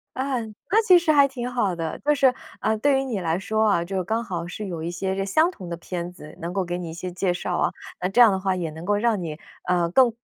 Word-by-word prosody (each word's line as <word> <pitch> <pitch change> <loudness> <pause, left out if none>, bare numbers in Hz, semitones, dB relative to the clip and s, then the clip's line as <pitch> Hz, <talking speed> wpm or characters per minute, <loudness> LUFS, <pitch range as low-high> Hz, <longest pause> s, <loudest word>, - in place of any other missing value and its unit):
啊， 260 -1 -1 0.3
那 440 +3 +5
其 365 - +9
实 340 -2 +2
还 285 -2 +6
挺 250 -2 -5
好 210 -7 0
的。 165 -1 -4
就 295 +1 +2
是， 270 -3 +4 0.3
呃， 220 - +2
对 270 +4 +3
于 - - -1
你 245 -7 -2
来 170 -1 0
说 220 +3 +1
啊， 170 -4 +2
就 190 +1 -2
刚 220 +5 -1
好 175 -6 -4
是 205 +4 -6
有 170 -4 -5
一 165 - -3
些 190 +2 -2
个 195 0 -1
相 315 - +3
同 185 - -9
的 170 - -4
片 175 0 -5
子， 155 -4 -12
能 170 +1 -3
够 195 0 0
给 175 0 -3
你 175 -2 -5
一 - - -7
些 180 +2 -5
介 180 0 0
绍 175 0 -2
啊， - - +1 0.3
那 180 - 0
这 195 - 0
样 230 -3 +8
的 190 - 0
话 190 -1 0
也 175 -3 -2
能 160 +2 -9
够 205 +2 +2
让 220 -2 +1
你， 155 -3 -5 0.3
呃， 175 -1 +2
更 245 +3 +5
190 Hz, 300 characters per minute, -24 LUFS, 175-240 Hz, 0.3 s, 其